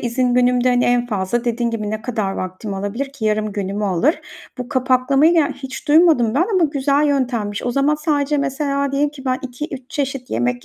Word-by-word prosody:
izin 245 +1 0
günümde, 250 0 +3
hani, 245 0 +2
en 245 0 +2
fazla 210 +2 -2
dediğin 235 0 0
gibi 215 -2 -3
ne 215 0 -4
kadar 220 -5 -2
vaktim 185 +2 -5
alabilir 225 +8 -4
ki? 250 -6 -7
Yarım 215 0 0
günümü 200 +1 -3
alır. 220 - +1 0.4
Bu 250 -1 -5
kapaklamayı, 265 +3 +3
ya, 320 -4 +3
hiç 265 +3 -9
duymadım 295 -8 +4
ben 330 +7 +2
ama 365 -3 +4
güzel 285 0 +1
yöntemmiş. 240 -7 -1
O 245 - -1
zaman 275 +4 +2
sadece, 295 -1 0
mesela, 280 0 -1
diyelim 285 +1 +1
ki 275 -2 -12
ben, 255 0 0
2-3 265 0 -7
çeşit 270 -3 -3
yemek 120 +1 -1
255 Hz, 190 wpm, -19 LUFS, 220-280 Hz, 0.4 s, duymadım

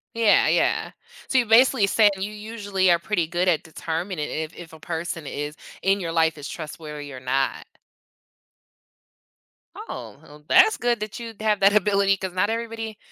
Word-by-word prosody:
Yeah, 230 -2 +4
yeah. - - +1 0.4
So, 265 - +1
you're 245 -3 +3
basically 230 0 +5
saying 205 +1 +4
you 195 +2 -4
usually 210 -3 -1
are 170 - +5
pretty 170 -1 -1
good 175 +2 -1
at 170 -4 +3
determining 165 0 -4
if 160 +1 -4
if 165 -2 -11
a 160 - -12
person 165 -1 -5
is 145 +2 -5 0.3
in 195 +1 +2
your 170 -3 -3
life 160 -1 +2
is 145 0 -7
trustworthy 150 -2 -8
or 130 - -8
not. 130 +2 -1 2.1
Oh, - - -8
well 150 0 -16
that's 435 0 +6
good 240 -1 0
that 215 +4 -5
you'd 230 -3 -9
have 215 -1 +1
that 195 +1 +5
ability, 200 -1 +3
'cause 190 -1 -5
not 185 +3 +1
everybody 225 -1 -4
190 Hz, 170 wpm, -24 LUFS, 160-215 Hz, 2.1 s, that's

